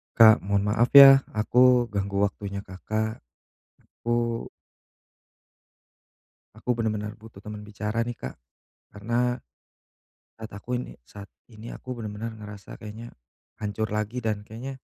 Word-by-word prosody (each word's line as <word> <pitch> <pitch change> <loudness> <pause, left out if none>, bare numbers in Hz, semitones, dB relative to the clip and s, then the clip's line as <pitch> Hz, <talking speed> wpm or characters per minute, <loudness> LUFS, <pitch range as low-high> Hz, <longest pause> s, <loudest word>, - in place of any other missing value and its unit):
Kak 110 -2 +8
mohon 100 +1 0
maaf 115 +3 +3
ya 135 -1 +11 0.2
aku 125 +2 +4
ganggu 100 0 -1
waktunya 100 0 -3
Kakak. 110 +4 -4 0.6
Aku 120 0 -2 2.1
aku 115 +3 -2
benar-benar 110 -2 -2
butuh 110 -2 -14
teman 105 -1 -8
bicara 105 +2 -3
nih 120 - -4
Kak - - -7 0.6
karena 120 +4 -1 1.0
saat 110 0 -9
aku 120 +5 -4
ini 125 - -6
saat 100 +7 -11 0.2
ini 110 0 -10
aku 125 0 -7
benar-benar 110 0 -6
ngerasa 105 -2 -10
kayaknya 110 +2 -10 0.4
hancur 110 +1 -3
lagi 105 +3 -2
dan 110 -2 -2
kayaknya 125 +5 -7
110 Hz, 120 wpm, -26 LUFS, 105-120 Hz, 2.1 s, ya